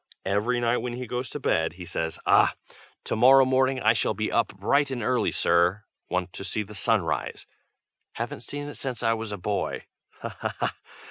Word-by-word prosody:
Every 105 +6 +1
night 120 0 +2
when 125 -1 -4
he 125 +1 -5
goes 125 +2 -4
to 150 - -6
bed 80 - +1
he 90 0 -9
says, 80 -1 -3
"Aha! - - +5 0.5
to - - -2
morrow 130 +4 +7
morning 130 0 +2
I 110 -1 +4
shall 110 -2 0
be 110 +2 -2
up 115 - +2
bright 140 +9 +1
and 125 -4 -3
early, 125 +3 +1
sir! 90 +4 +2 0.3
Want 90 0 -2
to - - -6
see 105 +2 -1
the 105 +1 -12
sun 100 - +2
rise. - - -3 0.7
Haven't - - -5
seen 145 0 -5
it 145 - -7
since 125 -3 -3
I 115 -1 +3
was 110 -1 -4
a 105 - -4
boy. 100 +2 -2 0.4
Ha! - - -6
ha! - - -3
ha!" - - -1
115 Hz, 205 wpm, -26 LUFS, 100-130 Hz, 0.7 s, morrow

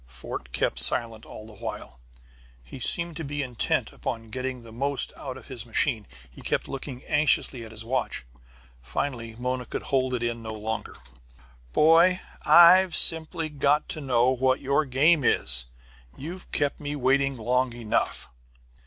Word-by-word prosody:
Fort 60 -1 -8
kept - - -1
silent 115 -2 0
all 110 - -11
the 110 - -13
while. 65 -10 -8 0.6
He - - -11
seemed 170 +5 +4
to 160 - -5
be 145 0 -4
intent 125 -3 -2
upon 115 -1 -6
getting 130 -1 -5
the 115 - -13
most 140 +4 0
out 130 -2 -8
of - - -14
his 125 -5 -7
machine, 115 -2 0 0.3
and - - -14
kept - - -2
looking 135 -1 -7
anxiously 145 -4 +1
at 110 - -11
his 110 0 -3
watch. 130 - -3 0.6
Finally 115 - -4
Mona 125 0 -4
could - - -5
hold 130 -2 0
in 120 0 -3
no 110 -1 -7
longer. 110 +1 -5 0.8
"Boy, 170 - +4 0.2
I've 180 +1 +6
simply 165 0 +4
got 145 0 +1
to 155 - -5
know 125 -2 +2
what 130 0 +1
your 140 +3 0
game 145 +4 +3
is. - - +4 0.5
You've 175 +6 -9
kept 145 -1 -1
me 145 0 -5
waiting 135 0 +1
long 125 +3 0
enough." 115 -3 -2
130 Hz, 155 wpm, -25 LUFS, 115-145 Hz, 0.8 s, I've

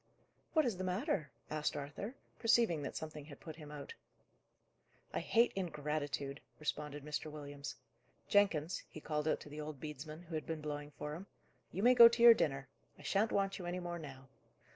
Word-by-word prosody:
"What 315 -3 +5
is 230 -7 0
the 185 - -3
matter?" 185 - 0 0.2
asked 155 -1 0
Arthur, 150 - -5 0.2
perceiving 225 -8 +4
that 140 - -4
something 155 -2 -5
had 145 -2 -11
put 160 -1 -9
him 150 -3 -9
out. 145 -1 -7 1.2
"I - - +1
hate 235 +1 +3
ingratitude," 150 -5 -2 0.2
responded 150 -1 -3
Mr. 150 +1 -3
Williams. 145 -2 -6 0.5
"Jenkins," 185 -6 +3
he - - -8
called 150 0 -2
out - - +2
to - - -10
the 150 +1 -6
old 150 -2 -6
bedesman, 155 +3 -7
who 170 -1 -10
had 155 -1 -3
been 160 -1 -2
blowing 145 -1 -4
for 150 0 -4
him, 180 +6 -7 0.4
"you 195 - -2
may 250 +1 +8
go 235 -2 +12
to 235 0 +2
your 235 -1 +12
dinner; 135 - 0 0.3
I - - -14
shan't 210 +3 +2
want 195 0 +1
you 175 - -5
any 180 +1 -2
more 175 -1 -4
now." 135 -3 -9
155 Hz, 185 wpm, -36 LUFS, 150-185 Hz, 1.2 s, go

